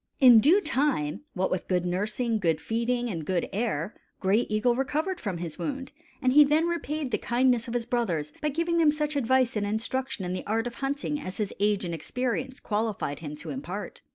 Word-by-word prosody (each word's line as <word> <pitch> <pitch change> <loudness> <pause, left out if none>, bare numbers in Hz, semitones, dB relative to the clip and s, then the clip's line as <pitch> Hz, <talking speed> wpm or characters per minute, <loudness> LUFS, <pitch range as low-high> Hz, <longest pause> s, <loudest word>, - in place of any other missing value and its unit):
In 245 -4 +9
due 330 - +5
time, 265 - 0
what 190 0 0
with 185 - -2
good 180 -1 +1
nursing, 215 +5 0
good 165 -5 +1
feeding, 240 +2 -1
and 170 -8 -4
good 180 +2 -1
air, 200 -4 -1 0.3
Gray 200 +5 +2
Eagle 215 +3 +2
recovered 300 +8 -1
from 195 -6 -3
his 165 -2 -6
wound; 270 -2 -4 0.3
and 255 0 +3
he 295 +1 +9
then 300 +3 +3
repaid 310 -5 -2
the - - 0
kindness 245 0 +2
of 235 - -4
his 235 -1 0
brothers 185 -12 -1
by 300 - +1
giving 335 +3 0
them 320 -2 +5
such 300 0 -1
advice 260 -1 +2
and 210 - 0
instruction 225 0 -2
in 180 - -2
the 185 - -3
art 225 +2 0
of 245 - -4
hunting 285 +2 -1
as 185 - -6
his 210 -3 -2
age 205 -1 +2
and 170 - -3
experience 255 - -3
qualified 210 -9 -2
him 150 -2 -6
to 155 +1 -7
impart. 175 +10 -6
235 Hz, 205 wpm, -27 LUFS, 190-270 Hz, 0.3 s, In